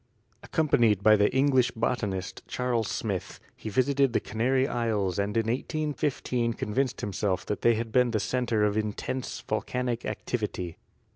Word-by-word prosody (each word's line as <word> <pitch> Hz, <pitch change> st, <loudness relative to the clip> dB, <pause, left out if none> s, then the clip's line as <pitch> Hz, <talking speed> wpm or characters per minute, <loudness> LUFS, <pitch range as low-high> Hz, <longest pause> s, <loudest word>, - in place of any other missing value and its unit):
Accompanied 115 Hz, -, +2 dB
by 110 Hz, +1 st, +7 dB
the 105 Hz, 0 st, +3 dB
English 130 Hz, -2 st, +3 dB
botanist, 100 Hz, -5 st, -2 dB
Charles 120 Hz, -3 st, -1 dB
Smith, 100 Hz, -5 st, -3 dB, 0.2 s
he 110 Hz, -, -6 dB
visited 135 Hz, +3 st, +2 dB
the -, -, +3 dB
Canary 130 Hz, +4 st, +1 dB
Isles 105 Hz, -7 st, 0 dB
and 100 Hz, +2 st, 0 dB
in 115 Hz, -, +2 dB
1815 130 Hz, -2 st, -1 dB
convinced 125 Hz, +5 st, -1 dB
himself 100 Hz, -1 st, -1 dB
that 105 Hz, -, -3 dB
they 120 Hz, -1 st, +4 dB
had 115 Hz, 0 st, -3 dB
been 125 Hz, +1 st, +4 dB
the 110 Hz, -2 st, 0 dB
center 115 Hz, 0 st, 0 dB
of 105 Hz, -1 st, +2 dB
intense 110 Hz, +4 st, -3 dB
volcanic 120 Hz, +3 st, -2 dB
activity. 100 Hz, -7 st, -3 dB
115 Hz, 145 wpm, -28 LUFS, 105-125 Hz, 0.2 s, by